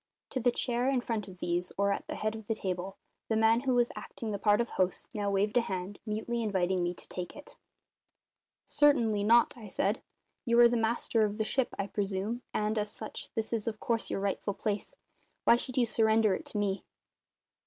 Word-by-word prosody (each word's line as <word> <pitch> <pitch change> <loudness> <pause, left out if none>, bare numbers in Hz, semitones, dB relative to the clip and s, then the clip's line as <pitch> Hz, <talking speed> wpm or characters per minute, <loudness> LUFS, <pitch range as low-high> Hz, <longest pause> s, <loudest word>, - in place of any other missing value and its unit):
To 260 - -1
the 245 0 +3
chair 245 +1 0
in 270 -2 +2
front 225 -4 -3
of 185 -1 -11
these, 175 0 -1
or 200 0 +2
at 200 - -3
the - - -4
head 215 +1 -1
of 220 -2 -9
the 225 - 0
table, 190 -1 -4 0.3
the 220 - +2
man 225 +1 +4
who 260 0 +1
was 240 -1 +3
acting 225 -2 -6
the 200 - -3
part 205 +1 +4
of 235 - 0
host 185 +4 -1
now 205 -2 -1
waved 205 +3 +1
a - - +6
hand, 190 -2 -4
mutely 220 +2 -2
inviting 190 -4 +1
me 175 0 -1
to - - -9
take 180 -1 -6
it. 290 - -11 1.1
"Certainly 235 -8 +3
not," 235 +3 +5
I 225 -4 -10
said. 205 +4 0 0.4
"You 235 -2 +3
are 240 - +10
the 240 - 0
master 225 0 +1
of 210 0 -1
the 220 - 0
ship, 260 +2 0
I 200 - -1
presume, 200 +3 -2
and, 215 +1 0
as 210 0 -1
such, 215 +1 -7
this 225 +1 -2
is 225 -2 -1
of 215 -2 -2
course 230 -1 -1
your - - -1
rightful 200 0 -1
place. 210 - -3 0.5
Why - - +7
should 250 +1 -4
you 245 - +5
surrender 220 -2 +3
it - - -4
to - - -5
me?" 200 -1 0
215 Hz, 215 wpm, -31 LUFS, 200-235 Hz, 1.1 s, are